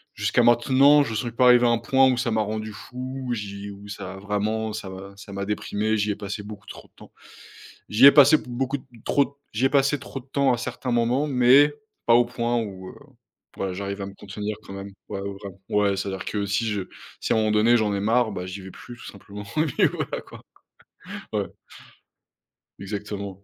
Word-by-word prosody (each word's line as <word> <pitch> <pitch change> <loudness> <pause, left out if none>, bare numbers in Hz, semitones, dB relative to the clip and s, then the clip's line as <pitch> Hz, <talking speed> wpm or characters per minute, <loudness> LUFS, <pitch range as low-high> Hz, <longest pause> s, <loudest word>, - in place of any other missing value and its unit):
jusqu'à - - +2
maintenant, 130 +5 +5
j'en 115 - -4
suis 120 +2 -2
pas 120 +3 +2
arrivé 125 0 +6
à - - +4
un 120 - +3
point 130 +2 +3
où 125 - -1
ça 120 -1 -1
m'a 110 0 +1
rendu 110 0 -4
fou, 130 +5 -7
j'y 100 -2 -6
où 100 0 -11
ça 100 -2 -7
a - - -10
vraiment 105 +2 -2
ça 105 -3 -6
m'a 95 +1 -10
ça 100 0 -11
m'a 100 0 -3
déprimé, 105 +1 -1
j'y 105 0 0
ai - - -2
passé 100 +1 -5
beaucoup 105 -1 -10
trop - - -11
de - - -44
temps. - - -15 0.8
J'y 115 +6 +6
ai 140 - +11
passé 145 +1 +8
beaucoup 130 +3 -3 0.3
trop 140 0 +1 0.2
j'y 110 +5 -1
ai - - +4
passé 140 +1 +3
trop 135 0 -8
de 125 - -21
temps 135 -1 +2
à 120 - +1
certains 125 +2 -4
moments, 120 +5 +1
mais 135 +2 +5 0.3
pas 115 - +6
au 120 +1 +6
point 120 0 -1
où, 95 -4 -6
heu - - -13 0.6
voilà, 95 -1 -2
j'arrive 100 +1 -4
à 95 - -4
me 100 - -9
contenir 105 +1 -5
quand - - -10
même, 100 0 -7 0.2
ouais, 100 - -4
vraiment 100 -1 -7
ouais, 100 -1 +2
c'est-à-dire 95 -1 -4
que 105 -1 -2
si 105 +3 0
je 105 -3 -1 0.4
si - - -1
à - - +3
un - - +3
moment 110 -1 +1
donné 110 +3 +4
j'en 105 -3 +1
ai 100 - -1
marre, 115 +2 +2
bah, 90 -2 -5
j'y 95 +2 -7
vais 95 0 -10
plus, 120 - -11
tout - - -14
simplement, 100 +1 -10
et 155 - +3
puis 140 - +2
voilà, - - -3
quoi. - - -14 0.9
Ouais. - - -1 1.3
Exactement. 100 -1 -6
110 Hz, 220 wpm, -24 LUFS, 100-125 Hz, 1.3 s, ai